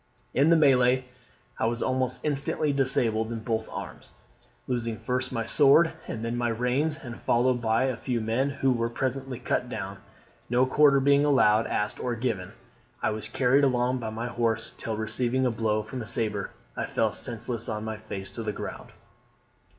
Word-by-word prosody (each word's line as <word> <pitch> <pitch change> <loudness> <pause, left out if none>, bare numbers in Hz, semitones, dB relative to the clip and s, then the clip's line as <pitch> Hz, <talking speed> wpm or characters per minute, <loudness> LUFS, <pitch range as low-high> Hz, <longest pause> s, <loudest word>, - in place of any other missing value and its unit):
"In 140 +4 +4
the 170 - +6
MELEE 130 -4 +4 0.5
I - - +2
was 120 +1 -1
almost 130 +1 -1
instantly 145 0 +1
disabled 120 -5 +2
in 115 -1 -4
both 110 -1 -2
arms, - - -8 0.6
losing 115 -3 -2
first 125 +4 -2
my 115 -1 -2
sword, 150 +6 +5
and 115 0 -4
then 115 +1 -2
my 120 0 0
reins, 125 +7 0
and 120 -2 -8
followed 120 +1 +2
by 115 +2 +2
a 130 -2 0
few 125 -2 -2
men, 115 +5 0
who 135 -1 +1
were 115 -1 0
presently 130 +1 -3
cut 120 - -2
down, - - -5 0.5
no 125 +2 +3
quarter 140 +1 +5
being 140 +1 +4
allowed, 115 -7 +4
asked 105 0 -1
or 125 -1 -2
given, 110 -6 -3 0.5
I - - +2
was 110 0 -4
carried 135 +4 +3
along 125 -1 +2
by 115 -2 -4
my 110 +2 -4
horse, 115 -2 -1
till, 110 -1 -4
receiving 125 +4 0
a 125 - +2
blow 110 -1 0
from 125 +4 -6
a 110 - -7
sabre, 105 -5 0 0.3
I - - -3
fell - - 0
senseless 115 0 -4
on 105 -1 -3
my 110 0 -4
face 100 -2 -7
to 115 - -6
the 110 -1 -2
ground. - - -7
120 Hz, 180 wpm, -27 LUFS, 110-130 Hz, 0.6 s, the